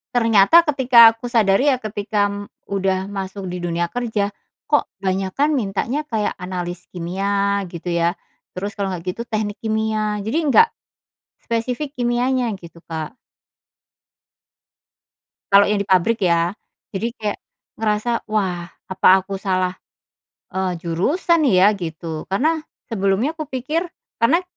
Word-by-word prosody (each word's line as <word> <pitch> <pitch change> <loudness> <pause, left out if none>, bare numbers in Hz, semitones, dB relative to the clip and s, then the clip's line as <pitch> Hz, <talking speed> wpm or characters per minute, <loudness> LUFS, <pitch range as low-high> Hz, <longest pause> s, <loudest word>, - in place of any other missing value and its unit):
ternyata 230 +6 +6
ketika 245 -5 +7
aku 245 +2 -7
sadari 220 +3 +3
ya 255 - +1
ketika 205 -2 -2 0.2
udah 190 -1 -1
masuk 195 0 -5
di 180 0 -4
dunia 170 0 -1
kerja, 220 -4 -1 0.4
kok 295 - +2 0.2
banyakan 190 +10 0
mintanya 240 +6 -1
kayak 220 -5 -1
analis 180 -1 -5
kimia 200 +3 -1
gitu 175 +1 -8
ya, 170 +2 +1 0.4
terus 200 +3 -3
kalau 200 -2 -2
nggak 180 -1 -6
gitu 235 - -4
teknik 210 -2 -3
kimia. 215 -1 -1
Jadi 225 +9 -1
nggak, 455 - +7 0.8
spesifik 250 +5 -3
kimianya, 245 0 +1
gitu 170 -1 -13
Kak. 160 +5 -5 2.4
Kalau 200 0 +8
yang 205 0 +1
di 200 - -3
pabrik 190 +5 +3
ya, 170 -1 +2 0.4
jadi 220 +4 -1
kayak, 210 -1 -3 0.4
ngerasa, 215 +1 0 0.2
"Wah 185 -5 -1 0.2
apa 185 0 +3 0.2
aku 195 0 -5
salah," 185 -2 0 0.8
eee, 190 -1 -1
"jurusan 300 - +1
ya?" 190 +1 +5
Gitu 165 -4 -6
karena 310 - +1 0.3
sebelumnya 200 +6 +1
kupikir 310 +2 -3 0.3
karena 325 +10 +4
205 Hz, 125 wpm, -21 LUFS, 185-235 Hz, 2.4 s, Kalau